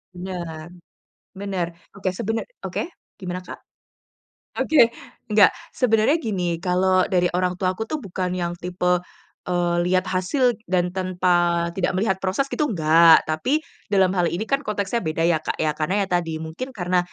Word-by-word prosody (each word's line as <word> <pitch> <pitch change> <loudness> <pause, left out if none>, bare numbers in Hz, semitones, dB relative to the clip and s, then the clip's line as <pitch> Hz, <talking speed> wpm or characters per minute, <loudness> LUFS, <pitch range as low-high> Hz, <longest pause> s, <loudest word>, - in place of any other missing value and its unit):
Bener, 175 -3 -6 0.7
bener. 190 -3 -2 0.3
Oke 195 -2 -2
sebener 225 +5 -2 0.2
oke - - -2 0.3
gimana, 180 -2 -5
Kak? 185 - -10 1.0
Oke, 235 -7 +5 0.4
nggak, 210 -1 +7 0.2
sebenarnya 235 +5 +2
gini, 180 - -2
kalau 185 +1 +2
dari 180 -1 +2
orang 180 0 0
tuaku 185 +4 -2
tuh 305 0 -4
bukan 185 -2 -3
yang 175 -1 -2
tipe, 180 0 0 0.5
eee, 175 -1 +1
lihat 185 0 +2
hasil 235 +6 +1
dan 180 -1 +1
tanpa 175 -2 +1
tidak 185 +1 -1
melihat 190 0 +1
proses 195 +9 -1
gitu 300 - 0
nggak, 165 - +6
tapi 255 - 0 0.2
dalam 190 -2 +3
hal 180 -2 +1
ini 175 +6 -2
kan 275 +5 0
konteksnya 210 -3 -2
beda 165 -4 -2
ya 165 -1 +3
Kak 155 - -3
ya. 155 -1 0
Karena 185 +7 0
ya - - -4
tadi 165 -2 -4
mungkin 160 +12 -6
karena, 180 -2 +1
185 Hz, 155 wpm, -23 LUFS, 175-200 Hz, 1.0 s, nggak